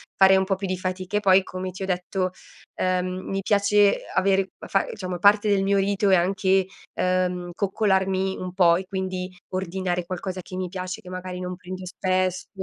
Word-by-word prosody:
fare 190 0 +6
un 190 - +3
po' 195 0 +1
più 195 +1 -5
di 185 - -1
fatica 185 +2 -3
e - - +3
poi 190 -1 +5
come 185 0 -5
ti 190 +2 -7
ho - - -1
detto, 185 0 -1 0.5
ehm, 185 0 +1 0.2
mi 195 0 -1
piace 205 0 +3
avere 195 0 +3
fa 195 - 0
diciamo 185 -3 -5
parte 205 +3 +5
del 200 -1 +3
mio 200 +1 +2
rito 200 +1 +1
è 190 - +6
anche, 190 +1 +2 0.3
ehm, 180 -1 0
coccolarmi 190 -1 +1
un 180 -1 -5
po' 175 -3 +5
e 190 - -5
quindi 185 -1 -3 0.2
ordinare 185 -1 -2
qualcosa 185 +1 -4
che 185 - -10
mi 185 0 -2
piace, 185 0 -5
che 180 - -12
magari 185 0 -6
non 180 0 -4
prendo 185 0 -8
spesso, 185 0 -1
185 Hz, 190 wpm, -24 LUFS, 185-195 Hz, 0.5 s, fare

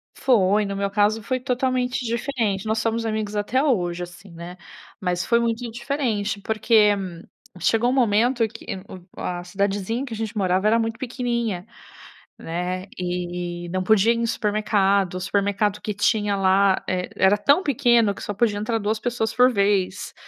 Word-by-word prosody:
Foi, 210 -4 +3
no 200 - -4
meu 200 0 -1
caso 210 +2 +2
foi 255 +4 -2
totalmente 250 -1 -1
diferente. 225 -4 -1
Nós 220 0 0
somos 225 0 -1
amigos 215 -1 -2
até 230 +6 +1
hoje, 180 - 0
assim, 175 +2 -12
né. 170 +2 -9 0.4
Mas, 180 -2 -1
foi 235 0 +3
muito 235 +1 -1
diferente 230 -5 -2
porque, 220 0 +3 0.7
chegou 225 +7 +2
um 255 - +1
momento 235 0 +2
que - - -12 0.2
um - - -9
o 180 - -14 0.2
a 175 0 -3
cidadezinha 200 +5 -2
em - - -3
que 245 - -7
a - - -3
gente 220 -1 -4
morava 190 +1 +1
era 225 - +4
muito 225 0 -2
pequenininha, 235 -7 -2 0.7
né, 180 +3 -4
e 175 -1 -4
não 185 0 -1
podia 220 +3 +4
ir - - -2
em 230 0 0
supermercado, 200 -4 +1
o 185 - -4
supermercado 205 +1 0
que 210 - -3
tinha 205 0 +1
lá 195 0 +3
e 180 -1 -2
era 190 +2 +4
tão 285 - +3
pequeno 240 - +3
que - - -10
só 205 - -3
podia 205 0 +1
entrar 225 +2 -1
2 215 +1 -1
pessoas 225 -2 -2
por 250 +1 +5
vez. 200 -2 0
210 Hz, 175 wpm, -23 LUFS, 190-235 Hz, 0.7 s, por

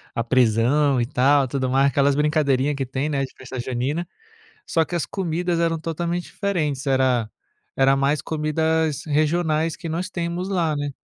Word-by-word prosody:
a 115 - 0
prisão 130 +4 +3
e 120 - +1
tal 135 +2 +3
tudo 130 0 -2
mais, 135 +2 +3
aquelas 140 0 +2
brincadeirinha 145 -2 +1
que 135 -2 -3
tem, 130 +3 -2
né, 140 -3 -1
de 135 - -6
festa 130 0 -7
junina, 130 +7 -2 0.6
só 165 - +2
que 175 - -7
as 170 - -1
comidas 175 -2 -2
eram 165 -1 +1
totalmente 170 +2 -3
diferentes, 155 -9 -2
era 130 -4 +2 0.4
era 135 0 +4
mais 140 +2 +1
comidas 160 -1 0
regionais 155 +1 +1
que 165 +1 -7
nós 175 +4 -3
temos 175 0 -3
lá, 165 -5 0
né, 145 0 -2
150 Hz, 170 wpm, -22 LUFS, 135-165 Hz, 0.6 s, era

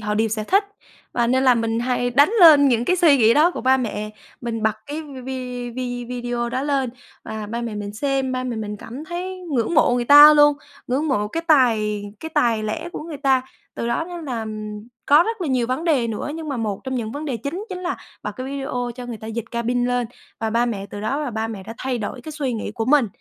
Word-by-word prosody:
họ 210 0 -2
đều 220 +1 +1
sẽ 215 0 -2
thích, 395 - +3 0.5
và 240 -1 +1
nên 260 +2 +2
là 255 -2 +6
mình 230 0 -1
hay 245 0 0
đánh 285 +7 +5
lên 300 -5 +8
những 240 -2 +2
cái 365 +8 +2
suy 325 -5 +5
nghĩ 230 -2 +5
đó 310 +4 +5
của - - -6
ba 260 +1 +4
mẹ. 215 -4 -3 0.3
Mình 230 -2 -4
bật 220 -1 +2
cái 295 +2 -5
v - - -12 0.2
vi 250 -2 -5
vi 245 0 -4
video 240 0 -3
đó 255 +2 -2
lên 275 -3 0 0.3
và 215 -1 -5
ba 235 +3 -4
mẹ 230 -3 -4
mình 205 0 -5
xem, 270 +3 -1
ba 255 0 -2
mẹ 245 -2 -3
mình 210 -1 -4
cảm 245 +8 -9
thấy 365 +3 -5
ngưỡng 245 +6 0
mộ 270 -5 +4
người 245 - 0
ta 290 +3 +10
luôn, 295 -1 +6 0.3
ngưỡng 280 +5 0
mộ 210 -7 0
cái 330 +9 -3
tài 220 -8 +3 0.2
cái 320 - -5
tài 235 -7 +2
lẻ 215 +10 -3
của - - -5
người 315 -2 -7
ta. 270 -2 +2 0.3
Từ - - -3
đó 235 +7 0
nên 345 -2 -7
là 235 -5 -3 0.6
có 295 +3 +7
rất 450 +2 -3
là 340 - -2
nhiều 250 -3 +1
vấn 260 +6 -2
đề 285 -8 +2
nữa 225 +5 -4
nhưng 320 -1 -6
mà 275 - -2
một 215 -4 -3
trong 260 -1 -3
những 225 -3 -3
vấn 290 +4 -5
đề 275 -5 -2
chính 285 - -5
chính 370 -2 -5
là 360 0 -3 0.3
bật - - -4
cái 255 0 -5
video 270 -3 -3
cho 250 -1 -8
người 240 -2 -5
ta 220 - -10
dịch 225 0 -5
cabin 240 +1 0
lên, 245 -1 0 0.3
và 225 0 -2
ba 235 +2 +2
mẹ 200 -4 -3
từ 205 - -6
đó 220 +7 -1
là 290 -5 -3
ba 220 0 -2
mẹ 210 -4 -6
đã 220 +4 -8
thay 255 -2 -2
đổi 230 +3 -5
cái 310 +5 -8
suy 280 -5 -2
nghĩ 215 -2 -4
của 225 -2 -2
mình, 270 0 +4
250 Hz, 255 wpm, -22 LUFS, 225-290 Hz, 0.6 s, ta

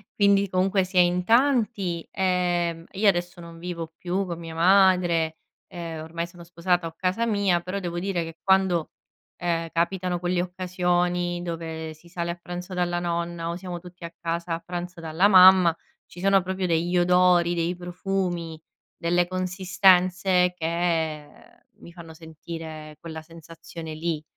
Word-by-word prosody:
quindi 200 -1 +4
comunque 190 +1 +1
si 185 0 -5
è - - +8
in 180 0 +3
tanti, 225 -7 +1
ehm, 175 -3 0
io 205 +2 +1
adesso 175 -1 -2
non 170 0 -11
vivo 170 -1 -6
più 185 +2 -2
con 170 -2 -4
mia 165 -1 -8
madre, 175 -2 +3 0.3
ehm, 165 -3 -6
ormai 170 +1 -4
sono 170 0 -14
sposata 175 +1 -1
ho 165 - -6
casa 185 +6 0
mia, 200 -6 +1
però 185 +3 -4
devo 175 -2 -4
dire 180 0 -1
che 165 0 -8
quando, 190 -4 +2 0.5
ehm, 165 -1 -1
capitano 180 +1 -1
quelle 175 0 0
occasioni 180 -1 -1
dove 160 -2 -5
si 165 +3 -20
sale 170 0 -4
a 170 - -2
pranzo 180 +2 -7
dalla 175 -1 0
nonna 170 -1 -3
o 170 - -3
siamo 180 -1 -6
tutti 180 0 -14
a 170 0 -7
casa 170 0 -2
a 165 - -2
pranzo 175 0 -6
dalla 165 +4 +2
mamma, 185 -3 +7 0.3
ci 175 - -14
sono 195 0 +4
proprio 190 0 -2
degli 170 +1 0
odori, 175 -1 +4
dei 170 +1 -1
profumi, 175 -2 -3 0.3
delle 175 +1 +1
consistenze 185 0 +2
che 165 -3 -1 0.5
mi 170 - -13
fanno 170 -2 -11
sentire 160 -1 -9
quella 160 -1 -8
sensazione 165 0 -10
lì, 160 -1 -3
175 Hz, 155 wpm, -25 LUFS, 170-185 Hz, 0.5 s, è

